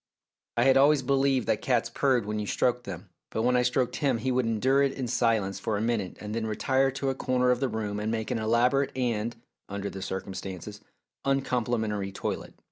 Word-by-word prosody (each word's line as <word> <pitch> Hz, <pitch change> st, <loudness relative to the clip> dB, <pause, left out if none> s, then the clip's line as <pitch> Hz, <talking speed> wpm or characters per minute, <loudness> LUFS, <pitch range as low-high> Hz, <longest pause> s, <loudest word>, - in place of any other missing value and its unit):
I -, -, +4 dB
had 135 Hz, 0 st, +5 dB
always 140 Hz, 0 st, +5 dB
believed 135 Hz, -1 st, +2 dB
that 105 Hz, -, 0 dB
cats 120 Hz, -3 st, +1 dB
purred 130 Hz, -4 st, +2 dB
when 105 Hz, 0 st, -2 dB
you 105 Hz, -, -3 dB
stroked 125 Hz, +2 st, +1 dB
them, 90 Hz, -1 st, -8 dB, 0.2 s
but 110 Hz, -, -2 dB
when 125 Hz, +1 st, +3 dB
I 125 Hz, -, +4 dB
stroked 125 Hz, 0 st, +1 dB
him 135 Hz, -5 st, +1 dB
he 130 Hz, +4 st, -1 dB
would 125 Hz, -2 st, +1 dB
endure 130 Hz, +5 st, +2 dB
it 140 Hz, -1 st, +2 dB
in 130 Hz, -3 st, -3 dB
silence 110 Hz, -5 st, +1 dB
for 105 Hz, +2 st, -1 dB
a -, -, -2 dB
minute 110 Hz, -5 st, -1 dB
and 105 Hz, 0 st, -6 dB
then 110 Hz, -1 st, -2 dB
retire 130 Hz, +5 st, +2 dB
to 135 Hz, 0 st, -1 dB
a -, -, -2 dB
corner 125 Hz, -1 st, +2 dB
of 125 Hz, -, +1 dB
the 135 Hz, -1 st, 0 dB
room 105 Hz, -2 st, -3 dB
and 105 Hz, +1 st, -2 dB
make 110 Hz, -1 st, -2 dB
an -, -, 0 dB
elaborate 120 Hz, +5 st, +2 dB
and, 120 Hz, -3 st, -1 dB, 0.3 s
under 100 Hz, 0 st, -4 dB
the 95 Hz, -, -7 dB
circumstances, 95 Hz, +1 st, -6 dB, 0.4 s
uncomplimentary 120 Hz, -7 st, 0 dB
toilet. 95 Hz, -, -4 dB
120 Hz, 210 wpm, -28 LUFS, 105-130 Hz, 0.4 s, had